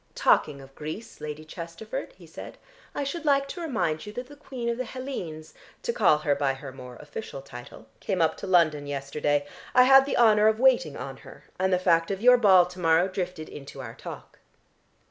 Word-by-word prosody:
"Talking 140 Hz, -2 st, +2 dB
of 135 Hz, 0 st, -15 dB
Greece, 155 Hz, +11 st, -8 dB
Lady 150 Hz, +1 st, -6 dB
Chesterford," 185 Hz, -, -7 dB
he -, -, -15 dB
said, -, -, -10 dB, 0.4 s
"I 285 Hz, -, -1 dB
should 315 Hz, +5 st, -4 dB
like 275 Hz, -2 st, +2 dB
to 350 Hz, -, -6 dB
remind 220 Hz, -, -1 dB
you 210 Hz, -, -7 dB
that 245 Hz, +3 st, -5 dB
the 290 Hz, +3 st, -14 dB
Queen 260 Hz, -4 st, -7 dB
of 235 Hz, 0 st, -1 dB
the -, -, 0 dB
Hellenes, 225 Hz, -, -7 dB, 0.3 s
to 475 Hz, -1 st, -1 dB
call 155 Hz, -, +4 dB
her 150 Hz, -1 st, +1 dB
by 140 Hz, -1 st, 0 dB
her 135 Hz, 0 st, -9 dB
more 125 Hz, -1 st, -11 dB
official 150 Hz, -, -8 dB
title, 120 Hz, -4 st, -11 dB
came 190 Hz, -3 st, -2 dB
up 160 Hz, -1 st, +2 dB
to -, -, -7 dB
London 155 Hz, -5 st, +3 dB
yesterday. 145 Hz, +1 st, -1 dB, 0.3 s
I 250 Hz, -, +8 dB
had 270 Hz, +1 st, +7 dB
the -, -, -1 dB
honour 215 Hz, -2 st, +5 dB
of 220 Hz, 0 st, +2 dB
waiting 250 Hz, -, +3 dB
on 135 Hz, +1 st, -7 dB
her, -, -, -14 dB, 0.2 s
and 190 Hz, 0 st, +1 dB
the 180 Hz, -, +4 dB
fact 165 Hz, -2 st, +2 dB
of 195 Hz, -1 st, -2 dB
your 250 Hz, +3 st, +6 dB
ball 190 Hz, -5 st, +6 dB
to 180 Hz, +1 st, -11 dB
morrow 165 Hz, +1 st, +3 dB
drifted 180 Hz, -4 st, -5 dB
into 140 Hz, -2 st, -10 dB
our -, -, -7 dB
talk." -, -, -10 dB
180 Hz, 205 wpm, -26 LUFS, 150-240 Hz, 0.4 s, I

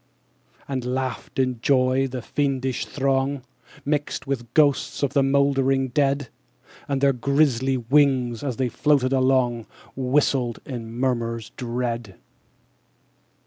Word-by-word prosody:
15. -, -, -27 dB
And 130 Hz, -2 st, -2 dB
laughed, 130 Hz, -2 st, -4 dB
in 130 Hz, -3 st, 0 dB
joy, 130 Hz, 0 st, +2 dB
the 125 Hz, -2 st, -6 dB
fiendish 135 Hz, -3 st, -1 dB
throng, 135 Hz, 0 st, 0 dB, 0.4 s
Mixed 145 Hz, 0 st, -2 dB
with 130 Hz, -4 st, -4 dB
ghosts 145 Hz, -2 st, +2 dB
of 140 Hz, -1 st, 0 dB
the 140 Hz, -, +4 dB
mouldering 135 Hz, -1 st, +2 dB
dead: 140 Hz, -1 st, 0 dB, 0.6 s
And 140 Hz, -2 st, -1 dB
their 140 Hz, -1 st, +4 dB
grisly 135 Hz, 0 st, +1 dB
wings, 125 Hz, -2 st, +2 dB
as 130 Hz, -5 st, -3 dB
they 130 Hz, -1 st, +1 dB
floated 135 Hz, 0 st, +1 dB
along, 130 Hz, -3 st, +2 dB, 0.3 s
Whistled 130 Hz, -2 st, +1 dB
in 115 Hz, -4 st, -6 dB
murmurs 115 Hz, -2 st, -2 dB
dread. 120 Hz, -4 st, -3 dB
130 Hz, 120 wpm, -23 LUFS, 125-140 Hz, 0.6 s, the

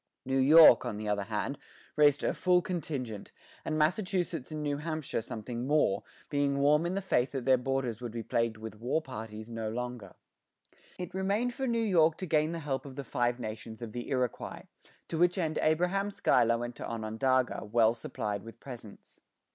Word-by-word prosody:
New 135 Hz, +1 st, +1 dB
York, 155 Hz, +4 st, +8 dB
on 120 Hz, -4 st, -4 dB
the 105 Hz, 0 st, -5 dB
other 105 Hz, -1 st, 0 dB
hand, 110 Hz, +6 st, -3 dB, 0.4 s
raised 145 Hz, -2 st, +4 dB
her -, -, +1 dB
full 180 Hz, -1 st, +3 dB
contingent, 135 Hz, -, -4 dB, 0.3 s
and 155 Hz, -, -2 dB
Massachusetts 175 Hz, -2 st, 0 dB
and 155 Hz, -1 st, -4 dB
New 145 Hz, -1 st, -1 dB
Hampshire 155 Hz, -5 st, -3 dB
something 115 Hz, +2 st, -5 dB
more, 145 Hz, -10 st, +2 dB, 0.3 s
being 140 Hz, -1 st, 0 dB
warm 150 Hz, +4 st, +3 dB
in 180 Hz, -, -2 dB
the 195 Hz, -, -2 dB
faith 130 Hz, -8 st, +1 dB
that 130 Hz, -3 st, -3 dB
their 130 Hz, -1 st, +6 dB
borders 125 Hz, -3 st, -2 dB
would 120 Hz, -2 st, -5 dB
be 115 Hz, 0 st, -5 dB
plagued 115 Hz, 0 st, 0 dB
with 110 Hz, -1 st, -8 dB
war 125 Hz, +7 st, 0 dB
parties 110 Hz, -5 st, -8 dB
no 115 Hz, -1 st, -3 dB
longer. 120 Hz, -4 st, -5 dB, 0.8 s
It 180 Hz, -1 st, -6 dB
remained 200 Hz, +6 st, 0 dB
for 265 Hz, +2 st, -3 dB
New 230 Hz, -1 st, +1 dB
York 165 Hz, -6 st, +4 dB
to 185 Hz, -, -4 dB
gain 155 Hz, -1 st, +2 dB
the 170 Hz, -, -3 dB
help 145 Hz, -4 st, -3 dB
of 135 Hz, -, -10 dB
the 140 Hz, -, -5 dB
Five 120 Hz, 0 st, 0 dB
Nations 110 Hz, 0 st, -6 dB
of 115 Hz, -, -6 dB
the 120 Hz, +2 st, -6 dB
Iroquois, 125 Hz, -4 st, -2 dB, 0.4 s
to 160 Hz, -, -3 dB
which 175 Hz, +2 st, +3 dB
end 160 Hz, -4 st, -1 dB
Abraham 180 Hz, +6 st, +1 dB
Schuyler 115 Hz, -, +3 dB
went 120 Hz, 0 st, -5 dB
to -, -, -5 dB
Onondaga, 115 Hz, +3 st, 0 dB
well 110 Hz, +1 st, +3 dB
supplied 105 Hz, -3 st, -4 dB
with 115 Hz, +2 st, -12 dB
presents. 120 Hz, -6 st, -11 dB
130 Hz, 185 wpm, -30 LUFS, 115-160 Hz, 0.8 s, York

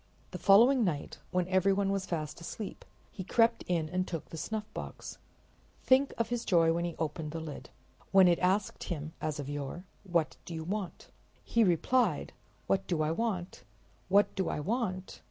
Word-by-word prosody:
The 180 Hz, -, -6 dB
following 230 Hz, +8 st, +6 dB
night, 155 Hz, -8 st, -2 dB
when 180 Hz, -1 st, 0 dB
everyone 195 Hz, +1 st, +2 dB
was 195 Hz, -1 st, -2 dB
fast 155 Hz, -1 st, -4 dB
asleep, 200 Hz, +5 st, -7 dB, 0.3 s
he 190 Hz, -, -6 dB
crept 230 Hz, +4 st, +3 dB
in 170 Hz, -3 st, 0 dB
and 185 Hz, +3 st, -1 dB
took 165 Hz, -4 st, -4 dB
the -, -, -8 dB
snuffbox. 215 Hz, +6 st, -6 dB, 0.6 s
Think 265 Hz, +2 st, +4 dB
of 230 Hz, -, 0 dB
his 240 Hz, -1 st, -1 dB
joy 165 Hz, -2 st, +4 dB
as 170 Hz, -, -1 dB
he 175 Hz, -1 st, -3 dB
opened 160 Hz, 0 st, -3 dB
the 165 Hz, -, -3 dB
lid! 160 Hz, -2 st, -8 dB, 0.4 s
When 190 Hz, -1 st, +7 dB
it 175 Hz, -1 st, +3 dB
asked 190 Hz, +3 st, 0 dB
him, 155 Hz, -2 st, -4 dB
as 155 Hz, -1 st, -2 dB
of 140 Hz, -, -4 dB
yore, 145 Hz, +5 st, -5 dB, 0.2 s
"What 170 Hz, -5 st, 0 dB
do 170 Hz, -, -7 dB
you 160 Hz, -, -4 dB
want?" 195 Hz, +1 st, -5 dB, 0.3 s
he 230 Hz, -, +2 dB
replied: 215 Hz, +7 st, +2 dB, 0.3 s
"What 195 Hz, -, 0 dB
do 165 Hz, -4 st, +1 dB
I 155 Hz, -, +1 dB
want? 190 Hz, -2 st, -2 dB, 0.5 s
What 200 Hz, +2 st, +4 dB
do 190 Hz, -2 st, -1 dB
I -, -, -2 dB
want? 190 Hz, -, -2 dB
180 Hz, 175 wpm, -31 LUFS, 165-205 Hz, 0.6 s, When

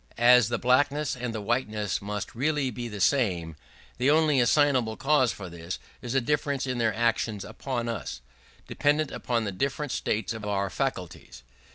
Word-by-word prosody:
As 120 Hz, -1 st, +6 dB
the 120 Hz, -, 0 dB
blackness 145 Hz, +3 st, +2 dB
and 125 Hz, -1 st, -4 dB
the 110 Hz, -2 st, -4 dB
whiteness 105 Hz, -2 st, -1 dB
must 105 Hz, 0 st, -5 dB
really 140 Hz, +1 st, 0 dB
be 120 Hz, +1 st, -5 dB
the 105 Hz, -3 st, -7 dB
same, 90 Hz, -, +1 dB, 0.4 s
the 130 Hz, +3 st, +3 dB
only 155 Hz, -2 st, +4 dB
assignable 125 Hz, -3 st, +3 dB
cause 135 Hz, -4 st, +3 dB
for 95 Hz, -1 st, -8 dB
this 85 Hz, 0 st, -6 dB, 0.2 s
is 120 Hz, +1 st, -4 dB
a -, -, +5 dB
difference 140 Hz, +1 st, 0 dB
in 125 Hz, -2 st, -2 dB
their 110 Hz, -2 st, +1 dB
actions 110 Hz, -3 st, 0 dB
upon 120 Hz, -3 st, -4 dB
us, 115 Hz, -, -4 dB, 0.5 s
dependent 145 Hz, +1 st, +1 dB
upon 120 Hz, -2 st, -1 dB
the 100 Hz, -, -2 dB
different 140 Hz, +7 st, -2 dB
states 110 Hz, +1 st, -1 dB
of 110 Hz, -1 st, -7 dB
our 100 Hz, -2 st, -1 dB
faculties. 65 Hz, -, -4 dB
120 Hz, 170 wpm, -27 LUFS, 105-135 Hz, 0.5 s, As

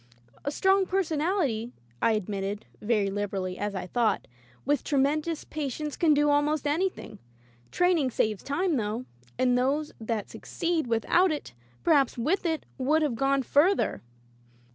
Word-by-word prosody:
"A -, -, -1 dB
strong 385 Hz, +5 st, +2 dB
personality," 310 Hz, -, 0 dB, 0.3 s
I 230 Hz, -, +4 dB
admitted, 205 Hz, 0 st, -3 dB, 0.2 s
very 210 Hz, -3 st, +1 dB
liberally, 195 Hz, -2 st, -3 dB
as 205 Hz, 0 st, -2 dB
I 185 Hz, -, -3 dB
thought, 230 Hz, +4 st, 0 dB, 0.4 s
"with 290 Hz, +2 st, +1 dB
tremendous 300 Hz, +3 st, 0 dB
patience 300 Hz, 0 st, -4 dB
can 315 Hz, -3 st, +4 dB
do 295 Hz, 0 st, +3 dB
almost 290 Hz, 0 st, +1 dB
anything. 295 Hz, -, -2 dB, 0.5 s
Training 355 Hz, -7 st, +2 dB
saves 215 Hz, -4 st, 0 dB
time 330 Hz, +2 st, 0 dB
though, 225 Hz, +2 st, -2 dB, 0.3 s
and 250 Hz, -1 st, +3 dB
those 275 Hz, +5 st, +1 dB
that 220 Hz, -2 st, -2 dB
succeed 335 Hz, -5 st, -2 dB
without 280 Hz, -, +3 dB
it, 300 Hz, -, -5 dB, 0.3 s
perhaps 285 Hz, -7 st, +3 dB
with 320 Hz, +10 st, 0 dB
it 320 Hz, -2 st, -2 dB
would 305 Hz, +5 st, +2 dB
have 290 Hz, -5 st, 0 dB
gone 270 Hz, +3 st, +1 dB
further." 320 Hz, +10 st, +2 dB
280 Hz, 140 wpm, -27 LUFS, 225-315 Hz, 0.5 s, I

